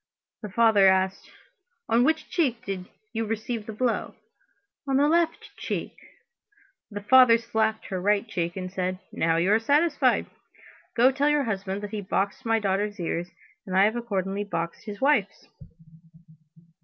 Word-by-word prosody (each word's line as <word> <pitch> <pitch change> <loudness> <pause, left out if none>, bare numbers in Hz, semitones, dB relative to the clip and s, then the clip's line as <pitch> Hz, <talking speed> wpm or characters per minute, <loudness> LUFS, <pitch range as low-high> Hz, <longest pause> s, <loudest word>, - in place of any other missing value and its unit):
The 210 - -6
father 210 -1 +4
asked: 190 0 +1 0.6
"On 235 +2 +3
which 315 +4 +1
cheek 250 -8 -1
did 190 -2 -4 0.3
you 225 0 -1
receive 225 0 -4
the - - -4
blow?" 235 +2 -2 0.7
"On 270 -1 +2
the 285 +1 +4
left 335 +1 0
cheek." - - -4 0.9
The 205 -2 -7
father 250 0 +7
slapped 220 -1 -1
her 185 -2 -4
right 205 +3 +1
cheek 175 -3 -3
and 185 -1 -5
said: 185 -1 -2
"Now 165 0 +1
you 180 +5 +2
are 220 - +4
satisfied. 285 +1 +2 0.7
Go 245 +3 +5
tell 280 +2 +1
your 295 -1 +2
husband 200 -3 -3
that 205 - -6
he 215 -2 -4
boxed 200 +5 -2
my 225 0 +3
daughter's 205 0 -1
ears, 170 0 -3 0.4
and 185 - -3
that 190 - +5
I - - +6
have 215 +2 0
accordingly 200 -4 -2
boxed 170 -4 -5
his 205 -1 -7
wife's." 255 -8 +1
215 Hz, 160 wpm, -26 LUFS, 195-245 Hz, 0.9 s, father